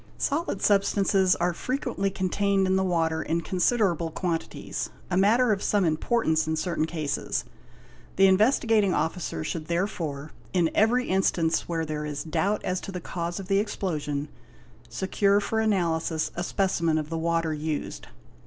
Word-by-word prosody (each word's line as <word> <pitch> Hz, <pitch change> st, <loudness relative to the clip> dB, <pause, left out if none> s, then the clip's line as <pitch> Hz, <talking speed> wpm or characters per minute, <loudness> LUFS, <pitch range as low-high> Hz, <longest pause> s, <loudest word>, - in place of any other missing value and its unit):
Solid 290 Hz, -, -1 dB
substances 195 Hz, -2 st, +3 dB
are 175 Hz, +1 st, 0 dB
frequently 225 Hz, -2 st, -2 dB
contained 195 Hz, +1 st, +1 dB
in 190 Hz, 0 st, +2 dB
the 190 Hz, -, +2 dB
water 165 Hz, -3 st, 0 dB
in 165 Hz, +1 st, -1 dB
considerable 180 Hz, -2 st, +1 dB
quantities, 165 Hz, 0 st, -3 dB, 0.2 s
a -, -, +1 dB
matter 220 Hz, +6 st, +4 dB
of 200 Hz, -2 st, 0 dB
some 205 Hz, -3 st, +2 dB
importance 160 Hz, 0 st, +1 dB
in 160 Hz, -, 0 dB
certain 165 Hz, 0 st, -1 dB
cases. 155 Hz, -4 st, -2 dB, 0.7 s
The 195 Hz, -, +5 dB
Investigating 210 Hz, 0 st, +3 dB
Officer 155 Hz, -, -2 dB
should 155 Hz, -, -4 dB
therefore, 165 Hz, -5 st, -2 dB, 0.2 s
in 175 Hz, -3 st, +2 dB
every 240 Hz, +4 st, +3 dB
instance 175 Hz, -4 st, +1 dB
where 165 Hz, -1 st, -1 dB
there 150 Hz, -1 st, -4 dB
is 145 Hz, -1 st, -4 dB
doubt 200 Hz, +6 st, -1 dB
as 185 Hz, 0 st, -1 dB
to -, -, -7 dB
the 180 Hz, -, -4 dB
cause 170 Hz, +1 st, -4 dB
of 190 Hz, -, -7 dB
the 195 Hz, 0 st, +3 dB
explosion, 150 Hz, -8 st, -2 dB, 0.6 s
secure 200 Hz, +1 st, +2 dB
for 220 Hz, +2 st, -1 dB
analysis 170 Hz, -7 st, 0 dB
a 175 Hz, -, -2 dB
specimen 170 Hz, -4 st, +1 dB
of 155 Hz, 0 st, -3 dB
the 165 Hz, -, -1 dB
water 165 Hz, -1 st, 0 dB
used. 155 Hz, 0 st, -4 dB
180 Hz, 155 wpm, -26 LUFS, 160-200 Hz, 0.7 s, The